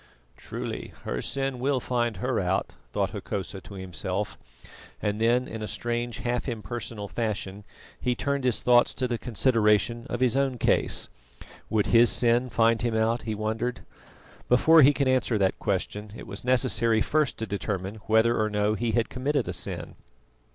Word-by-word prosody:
"Truly, - - -6
her - - -3
sin 135 -2 -2
will 135 +1 +1
find 120 -4 -1
her 125 +4 -1
out," 95 0 -1 0.2
thought - - -1
Hokosa 95 -1 -5
to 100 - -11
himself, 95 +2 -4 0.6
and 105 +1 -2
then 120 +2 +3
in 110 0 -6
a 105 - -3
strange 120 +1 -3
half 125 +2 -2
impersonal 115 -2 -5
fashion 105 -3 -3 0.4
he 125 -1 0
turned 140 +2 -1
his 125 -3 +1
thoughts 120 -1 +4
to 130 - -1
the 120 -2 -2
consideration 115 0 +2
of 120 - -3
his 130 -1 +2
own 135 -2 +1
case. - - +1 0.6
Would 105 -2 +2
his 115 +1 +7
sin 120 +1 +3
find 115 -1 +3
him 120 -2 0
out? 115 +2 +1
he 110 - -1
wondered. 110 +4 -2 0.7
Before 160 +6 +6
he 140 +1 +8
could 140 -1 0
answer 130 -3 +2
that 95 -2 +1
question, 105 +2 -3
it - - -9
was 100 - -8
necessary 120 -3 +2
first 155 -2 +1
to 110 - -3
determine 100 -1 -3
whether 110 +1 +3
or 110 - +1
no 105 0 +1
he 115 +1 -1
had 115 0 +2
committed 135 -1 -1
a - - -3
sin. - - -4
115 Hz, 170 wpm, -27 LUFS, 105-125 Hz, 0.7 s, he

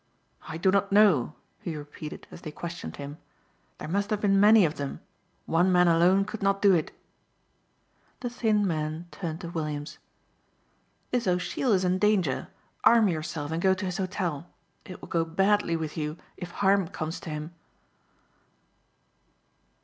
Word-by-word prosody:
"I 160 - -5
do 185 +3 +3
not 200 0 +1
know," 190 - +4 0.2
he 165 - -5
repeated 150 +1 -8
as - - -11
they 155 - -7
questioned 170 +3 -7
him. 145 +2 -8 0.6
"There - - -7
must 200 +5 -1
have 215 - 0
been 195 -1 +3
many 210 -1 +7
of 155 - -2
them. 140 -1 -4 0.5
One 175 +3 +2
man 180 -1 +5
alone 175 +4 +4
could 220 - -7
not 195 0 +2
do 200 -1 +5
it." 165 -3 0 1.3
The 245 - -2
thin 215 -4 +1
man 155 -1 -2
turned 165 -2 -5
to 170 - -6
Williams: 155 -2 -4 1.1
"This 245 -4 0
O'Sheill 180 +7 0
is 185 -1 +2
in 180 +1 +1
danger. 195 -10 +1 0.4
Arm 225 -3 +6
yourself 155 -2 -3
and 165 +1 -2
go 190 0 +4
to 190 +1 -4
his 180 0 -3
hotel. 180 -5 -3 0.4
It 185 - -10
will - - -9
go 165 -1 +1
badly 195 +2 +1
with 160 -2 -4
you 150 0 -3 0.2
if 180 - -7
harm 195 0 +2
comes 160 +1 -5
to - - -8
him." 155 +2 -5
175 Hz, 160 wpm, -27 LUFS, 155-195 Hz, 1.3 s, many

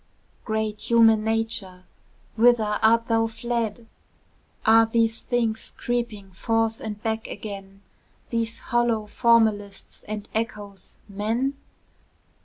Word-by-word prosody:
Great 220 -1 -2
human 225 -2 +5
nature, 220 -5 -2 0.5
whither 220 -2 +3
art 230 +1 +4
thou 225 -1 +2
fled? 230 -1 -3 0.8
Are 225 0 +6
these 225 0 +1
things 230 -3 -2
creeping 235 -5 -3
forth 225 +3 0
and 210 -1 -6
back 220 0 -2
agen, 195 -1 -8 0.5
These 230 0 -1 0.2
hollow 235 -2 +2
formalists 210 -3 +1
and 210 -1 -5
echoes, 205 -4 -5
men? 220 +7 -1
225 Hz, 100 wpm, -24 LUFS, 210-230 Hz, 0.8 s, Are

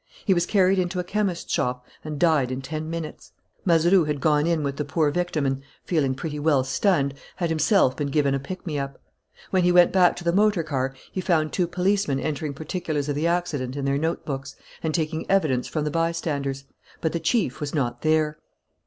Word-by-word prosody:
He 195 - +4
was 175 -1 +1
carried 195 -2 +3
into 180 0 -1
a - - 0
chemist's 195 -1 -2
shop 125 0 -1 0.2
and 155 -1 -5
died 155 -7 +3
in 130 +1 -4
ten 155 +3 -4
minutes. 165 -2 -6 0.3
Mazeroux 175 0 +4
had 150 -1 -2
gone 150 +1 +2
in 165 -3 +1
with 140 -1 -2
the 150 - -1
poor 150 +1 +1
victim 175 -3 -1
and, 135 0 -1 0.2
feeling 140 -6 +1
pretty 150 0 -4
well 145 -3 +3
stunned, 140 0 +1 0.2
had 170 -3 -1
himself 160 - +3
been 145 - -1
given 140 -1 +1
a 135 - 0
pick 185 +9 -7
me 150 -4 -2
up. 140 0 -5 0.5
When 185 - +3
he 180 - +4
went 175 0 +6
back 180 -2 +4
to 175 - -8
the 170 0 +1
motor 205 -3 +3
car 135 -3 -2 0.2
he 185 - -3
found 160 -4 +1
two 180 -2 +1
policemen 180 -4 +1
entering 145 0 -3
particulars 155 -1 -3
of 145 - 0
the 155 +3 +1
accident 160 -7 -1
in 140 -1 -3
their 140 0 +1
notebooks 140 -4 -3 0.3
and 160 - -1
taking 160 0 -2
evidence 155 -10 +2
from 155 - -2
the 150 - -1
bystanders; 150 -4 -1 0.4
but 160 - 0
the 170 - 0
chief 165 - 0
was 145 +1 -3
not 120 -4 -1
there. 155 -1 +1
155 Hz, 205 wpm, -24 LUFS, 140-175 Hz, 0.5 s, went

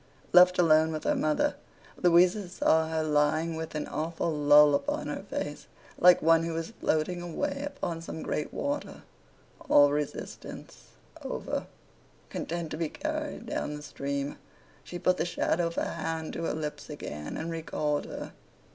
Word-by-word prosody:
Left 180 0 +7
alone 160 -2 +5
with 155 -1 -4
her - - +2
mother, 155 - +1 0.5
Louisa 180 +2 +4
saw 160 -3 +2
her 160 -1 0
lying 155 +2 +1
with 160 0 -5
an 150 - -2
awful 165 +2 -2
lull 150 -1 +6
upon 290 - -1
her - - -4
face, - - -4 0.3
like 180 -2 +6
one 165 0 +5
who 165 0 -2
was 165 +4 -4
floating 165 +3 0
away 280 - -3
upon 230 -13 -4
some 160 -1 -6
great 150 - -2
water, 285 +1 -4 0.7
all 145 0 +7
resistance 150 0 -5 0.4
over, - - -3 0.6
content 170 -1 -4
to - - -4
be 165 -1 -1
carried 310 - -4
down 150 -9 -3
the 150 - -8
stream. 140 0 -4 0.4
She 175 - -7
put 180 +1 +2
the - - +1
shadow 175 0 0
of 170 - -7
a - - +1
hand 160 -1 -4
to 165 - -3
her - - -1
lips 150 -1 -5
again, 75 - -6
and 165 +1 -4
recalled 155 -2 -2
her. - - -7
160 Hz, 160 wpm, -29 LUFS, 150-175 Hz, 0.7 s, Left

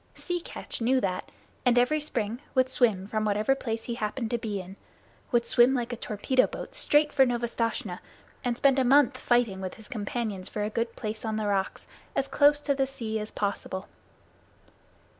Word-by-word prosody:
Sea 350 -1 -3
Catch - - -7
knew 255 +3 +3
that, 185 -5 -2 0.3
and 245 -1 +4
every 250 +6 +4
spring 235 -6 -2 0.2
would 260 0 +4
swim 220 -7 +2
from 215 +1 -2
whatever 210 +5 +2
place 225 -4 -3
he 240 - -4
happened 220 +1 -3
to 240 - 0
be 210 -3 -3
in 185 +1 -9 0.6
would 240 -2 +3
swim 245 +3 +5
like 245 -1 -2
a - - -1
torpedo 240 +4 +1
boat - - -7
straight 295 0 +3
for 270 - +6
Novastoshnah 230 -6 -1 0.4
and 240 -1 -1
spend 275 0 +4
a - - +4
month 265 0 +4
fighting 240 -7 +2
with 185 -1 -5
his 220 - -10
companions 210 -4 -3
for 210 - -3
a 210 - -2
good 230 +1 -2
place 215 -1 -5
on 220 -1 -2
the 215 -1 -1
rocks, 195 -1 -1 0.3
as 270 - +1
close 290 +1 +4
to 285 - +1
the 270 -1 +1
sea 230 -5 -4
as 210 0 -5
possible. 200 -2 -3
235 Hz, 190 wpm, -28 LUFS, 210-260 Hz, 0.6 s, for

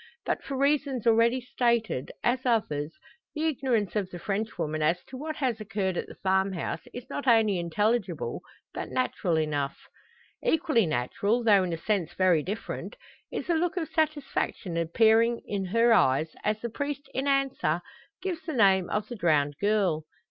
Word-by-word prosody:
But - - -1
for 275 -1 -4
reasons 280 -3 +1
already 230 +2 +4
stated, 235 - 0
as 255 +2 +1
others, 165 - 0 0.4
the 310 +1 -1
ignorance 250 - 0
of 200 -3 0
the 180 - -7
Frenchwoman 195 -6 -2
as 165 +4 +1
to 260 - -11
what 310 +4 -4
has 250 -7 -1
occurred 200 -3 -2
at - - -3
the - - -11
farmhouse, 190 -3 -1
is 245 +1 -8
not 280 0 -5
only 220 -5 +4
intelligible, 190 0 -1 0.3
but - - -5
natural 185 -9 0
enough. 145 -3 -1 0.7
Equally 315 - +2
natural, 200 - 0
though 205 -4 +6
in 180 - -2
a 165 - -2
sense 175 -2 -1
very 185 -4 +4
different, 205 - -5 0.4
is - - -3
the 345 - +1
look 345 +3 0
of 325 -3 -2
satisfaction 290 - -1
appearing 225 +8 +3
in 195 -2 -2
her 230 +5 +4
eyes, 145 -4 +3
as 215 +1 0
the 235 - -3
priest 285 +2 -4
in 265 +2 -1
answer 270 - +1 0.4
gives 355 -4 -3
the 320 - -2
name 195 -6 +4
of 210 0 -1
the 240 - -6
drowned 150 -7 +2
girl. 195 -7 +1
215 Hz, 165 wpm, -28 LUFS, 175-255 Hz, 0.7 s, though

